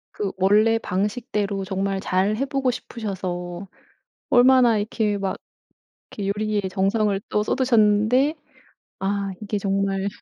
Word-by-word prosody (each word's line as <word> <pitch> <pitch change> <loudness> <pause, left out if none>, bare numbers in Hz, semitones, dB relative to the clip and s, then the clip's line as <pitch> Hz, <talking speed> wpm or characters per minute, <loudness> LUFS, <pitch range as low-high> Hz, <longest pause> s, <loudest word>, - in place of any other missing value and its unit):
그 200 -2 -2
원래 210 +4 +4
방식대로 205 -1 -2
정말 195 +1 -2
잘 190 +3 0
해 270 - 0
보고 270 -1 0
싶으셔서 185 -6 -5 0.6
얼마나 245 -2 +5
이렇게 210 0 -1
막 195 -1 -2 0.8
이렇게 200 -1 -4
요리에 210 +1 0
정성을 200 +1 +1
또 210 - +1
쏟으셨는데 245 +4 +2 0.6
아 200 0 -1
이게 210 0 -2
정말 195 0 -1
205 Hz, 260 characters per minute, -23 LUFS, 195-225 Hz, 0.8 s, 얼마나